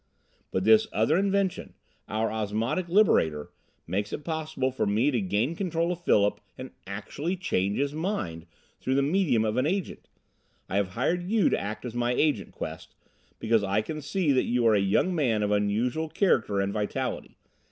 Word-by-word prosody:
"But 95 - -1
this 110 +1 +5
other 115 +9 +2
invention, 195 0 0 0.3
our 110 +1 -1
Osmotic 110 - -2
Liberator, 80 - +3 0.3
makes 100 +4 -2
it 150 - -6
possible 155 -5 -2
for 130 - -1
me 110 +8 +2
to 120 -5 0
gain 105 - 0
control 170 -2 -1
of 175 -1 -5
Philip 105 -9 +2 0.2
and - - -8 0.2
actually 140 - -4
change 100 - -1
his 140 +1 0
mind, 125 - -3 0.3
through 130 - -1
the 140 - +3
medium 150 - +2
of 110 +2 -1
an 130 +3 +2
agent. 190 +2 -3 0.6
I 95 - -1
have 100 -2 +1
hired 175 - -1
you 215 -4 +3
to - - 0
act 105 +4 -5
as 120 - -5
my 120 0 0
Agent, 150 +1 +1
Quest, - - -7 0.4
because 110 -1 +1
I 100 +2 +1
can 155 +7 -5
see 150 +2 0
that 130 - +2
you 120 0 +1
are 115 - +5
a 105 - +4
young 100 - +2
man 120 -10 +1
of 105 - 0
unusual 110 +10 0
character 110 - +1
and 100 0 -1
vitality. 105 -1 -3
120 Hz, 180 wpm, -27 LUFS, 105-165 Hz, 0.6 s, this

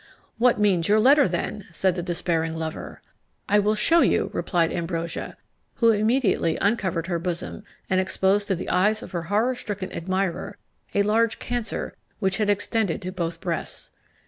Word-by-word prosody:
"What 240 -2 +4
means 190 -5 +2
your 210 +1 +4
letter, 275 +4 +6
then?" 185 +3 -4
said 185 +2 +1
the 175 - -3
despairing 170 -2 -1
lover. 160 -1 -6 0.4
"I 205 - +4
will 210 +1 +2
shew 330 +11 +4
you!" - - +2
replied 170 -3 0
Ambrosia, 170 -1 -4 0.4
who 230 -1 +4
immediately 215 -6 +1
uncovered 190 -6 0
her 175 -2 -2
bosom, 175 +3 -4 0.2
and 185 0 +2
exposed 190 +2 +1
to 195 - +1
the 170 - -5
eyes 210 +4 +2
of - - -10
her 175 -3 -2
horror 220 +5 +2
stricken 205 -5 -5
admirer 185 +1 -2 0.4
a 200 - +4
large 225 +2 +2
cancer 245 -2 -3 0.2
which 190 -3 0
had 210 -1 0
extended 205 -1 0
to 185 - -4
both 170 -3 -4
breasts. 170 -3 -4
190 Hz, 165 wpm, -24 LUFS, 170-215 Hz, 0.4 s, letter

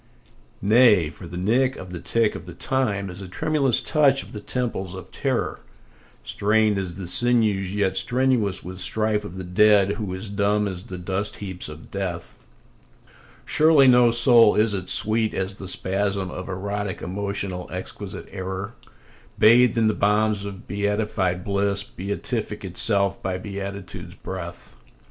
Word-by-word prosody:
Nay, 105 -7 +5
for 90 - -10
the 90 +1 -7
nick 125 +8 +1
of 90 -1 -9
the 90 - -6
tick 110 +6 +1
of 80 - -8
the 85 - -9
time 105 -7 -1
is 90 +1 -8
a 95 - -7
tremulous 135 - +1
touch 140 -3 +3
on - - -14
the 105 - -6
temples 105 -5 -3
of 95 - -10
terror, - - -2 0.6
Strained 105 0 +1
as 90 -3 -4
the 95 0 -6
sinews 105 -2 +2
yet 100 -2 +1
strenuous 120 -7 +1
with 95 +1 -7
strife 110 +1 +1
of 95 -3 -8
the 95 - -5
dead 100 +2 +4
who 105 -4 -4
is 95 +4 -6
dumb 100 +1 +1
as 95 -1 -6
the 90 - -7
dust 95 +3 -3
heaps 95 -5 -6
of 75 +1 -12
death; 90 -4 -5 1.1
Surely 155 -3 +5
no 125 -1 +6
soul 120 -2 +5
is 110 0 +2
it, 95 -2 -4
sweet 110 0 +2
as 95 +1 -2
the 95 - -8
spasm 95 0 -1
of 90 +1 -7
erotic 100 +1 -4
emotional 100 -1 -2
exquisite - - -7
error, 95 +3 -5 0.6
Bathed 120 +2 +5
in 115 - +3
the 110 - +3
balms 105 0 +1
of 100 -2 -8
beatified 100 -3 -1
bliss, 100 0 0
beatific 105 +2 -4
itself 100 +1 0
by 95 -1 -2
beatitude's 100 -1 -7
breath. 90 -2 -8
100 Hz, 155 wpm, -23 LUFS, 95-110 Hz, 1.1 s, no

